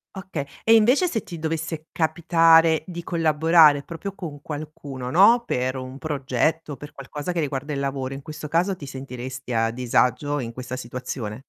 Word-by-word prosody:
Oka 190 -6 -4 0.2
e 225 - +5
invece 250 +11 +5
se 225 - -1
ti 170 - -9
dovesse 160 0 -3
capitare 165 0 +4
di 170 -2 -6
collaborare 160 -2 +4
proprio 175 +5 -6
con 155 -7 -7
qualcuno, 145 -4 -6
no, 225 - +6
per 130 +1 -1
un 130 +1 -7
progetto, 150 +1 -1
per 145 - -11
qualcosa 145 +4 -5
che 175 - -2
riguarda 145 -1 -2
il 140 - -2
lavoro. 135 -1 -3
In 140 - -9
questo 150 0 -7
caso 175 +5 +1
ti 145 -5 -10
sentiresti 130 -1 -7
a 115 0 +2
disagio 125 +4 +1
in 115 -3 -4
questa 125 +1 -6
situazione? 125 -3 -5
150 Hz, 165 wpm, -24 LUFS, 130-165 Hz, 0.2 s, no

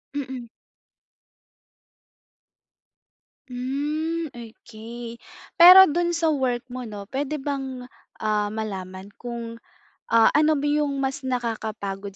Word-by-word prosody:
Mm. 260 -3 -5 3.0
Hmm, 295 +6 -3
okey, 235 0 -10 0.4
pero 365 +2 +10
dun 345 +3 0
sa 335 -1 0
work 255 -5 0
mo 250 0 -7
'no, 205 -3 -8
puwede 285 +4 -3
bang, 265 -3 -5 0.3
ah, 210 -1 0
malaman 190 -3 -6
kung, 235 -1 -7 0.5
ah, 230 -1 +5
ano 305 0 +3
ba 280 - -3
yung 295 -1 +1
mas 265 0 -3
nakakapagod 215 -5 -4
250 Hz, 100 wpm, -24 LUFS, 220-290 Hz, 3.0 s, pero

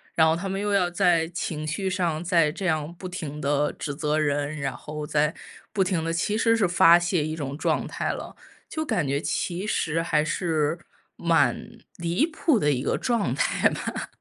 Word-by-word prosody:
然 160 - +5
后 160 - +4
他 180 +4 -4
们 195 - -2
又 205 - -1
要 185 -3 +3
在 175 -3 +3
情 160 -3 -4
绪 190 +5 -1
上 175 -4 -1
再 170 -4 +3
这 185 +5 -6
样 155 -1 -1
不 185 - -7
停 155 -5 -6
地 145 +1 +1
指 145 - -5
责 150 0 0
人， 145 0 0
然 135 -3 -2
后 150 +4 -6
再 150 0 +1 0.4
不 200 -3 +3
停 180 -4 0
地 165 - -1
其 205 +5 0
实 230 0 +3
是 215 - +3
发 170 -1 +7
泄 175 -3 0
一 155 - -3
种 140 -3 -5
状 - - 0
态 - - -3
了， - - -7 0.4
就 315 -1 -3
感 220 - 0
觉 140 +1 0
其 180 +5 -2
实 165 -6 0
还 155 -2 +1
是 160 -1 0 0.4
蛮 165 - +2 0.3
离 170 - +1
谱 315 -4 +1
的 150 -8 +2
一 130 -3 0
个 - - 0
状 235 -4 0
态 - - +2
吧。 - - -5
165 Hz, 215 characters per minute, -25 LUFS, 150-185 Hz, 0.4 s, 发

